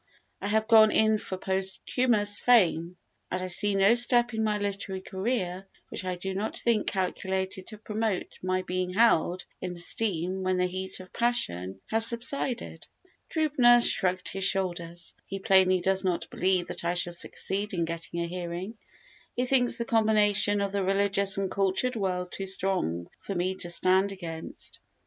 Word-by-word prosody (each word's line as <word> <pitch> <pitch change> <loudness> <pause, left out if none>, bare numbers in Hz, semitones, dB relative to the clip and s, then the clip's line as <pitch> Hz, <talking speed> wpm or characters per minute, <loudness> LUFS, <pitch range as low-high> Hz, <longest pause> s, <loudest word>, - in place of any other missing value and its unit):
I - - -3
have 220 +1 +1
gone 220 -1 +7
in 220 -1 +3
for 190 - -5
posthumous 205 +3 0
fame 180 -7 +3 0.3
and 185 - -2
I 185 - -3
see 195 +3 0
no 195 +3 +5
step 240 0 +4
in 220 0 -1
my 210 -1 +1
literary 200 -2 -3
career 190 -2 -3 0.2
which - - -4
I 185 -1 -2
do 190 +2 -5
not 205 +3 -2
think 230 -3 +1
calculated 190 0 -2
to 215 - -6
promote 215 -2 -3
my 185 0 -1
being 180 0 -2
held 185 -4 +3 0.2
in 180 -1 -4
esteem 180 0 -2
when 185 0 0
the 180 - +2
heat 185 +1 -3
of 185 0 -13
passion 95 - 0
has 225 +1 +4
subsided." 245 +1 -2 0.4
Trübner 275 -7 +4
shrugged 185 0 0
his 195 0 -3
shoulders. 175 -3 -1
He 195 - -4
plainly 190 -1 +4
does 190 +1 +1
not 180 -2 -1
believe 185 -1 +1
that - - -5
I 175 +1 0
shall 175 0 0
succeed 200 +4 -3
in 170 -4 -1
getting 170 +1 -4
a - - -1
hearing; 180 +4 -6 0.6
he 250 - 0
thinks 250 -1 +2
the 235 - -2
combination 210 -2 +3
of 200 -1 -1
the 200 -1 -1
religious 195 0 +2
and 195 -1 -1
cultured 200 +6 +1
world 180 -4 -2
too 195 - -5
strong 185 - -1
for 195 - -6
me 180 +2 0
to 175 - -2
stand 185 +3 +2
against. 165 -4 -7
190 Hz, 170 wpm, -28 LUFS, 180-215 Hz, 0.6 s, gone